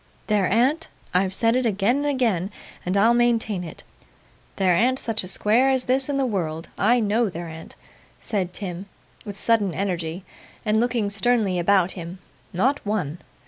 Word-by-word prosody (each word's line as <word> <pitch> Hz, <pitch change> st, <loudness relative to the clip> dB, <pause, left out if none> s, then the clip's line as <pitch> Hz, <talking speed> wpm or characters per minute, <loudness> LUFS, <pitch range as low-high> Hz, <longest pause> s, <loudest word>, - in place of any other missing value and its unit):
There 205 Hz, -4 st, +1 dB
an't 265 Hz, +9 st, +2 dB, 0.3 s
I've 185 Hz, +1 st, +2 dB
said 230 Hz, +4 st, +2 dB
it 255 Hz, -1 st, +2 dB
again 210 Hz, +4 st, +1 dB
and 290 Hz, +1 st, -1 dB
again, 230 Hz, -10 st, 0 dB, 0.4 s
and 185 Hz, +2 st, +1 dB
I'll 225 Hz, +4 st, +5 dB
maintain 230 Hz, -5 st, +1 dB
it 165 Hz, -, -9 dB, 0.7 s
there 185 Hz, -3 st, +3 dB
an't 250 Hz, +7 st, +2 dB
such 225 Hz, -5 st, -2 dB
a -, -, -7 dB
square 220 Hz, +7 st, +2 dB
as 260 Hz, -1 st, +1 dB
this 260 Hz, +2 st, +1 dB
in 280 Hz, -, 0 dB
the 270 Hz, -, +1 dB
world. 165 Hz, -7 st, -3 dB
I 240 Hz, +4 st, +3 dB
KNOW 220 Hz, +1 st, +1 dB
there 175 Hz, -1 st, -6 dB
an't,' 160 Hz, 0 st, -10 dB, 0.4 s
said 190 Hz, -5 st, -2 dB
Tim, 185 Hz, 0 st, -6 dB, 0.4 s
with 205 Hz, -2 st, -7 dB
sudden 210 Hz, -6 st, +1 dB
energy, 180 Hz, -2 st, -3 dB, 0.4 s
and 215 Hz, 0 st, +2 dB
looking 235 Hz, -3 st, 0 dB
sternly 205 Hz, -3 st, +1 dB
about 190 Hz, 0 st, +3 dB
him. 175 Hz, 0 st, -6 dB, 0.3 s
'Not 260 Hz, +11 st, +1 dB
one. 180 Hz, -7 st, -2 dB
205 Hz, 170 wpm, -23 LUFS, 185-240 Hz, 0.7 s, I'll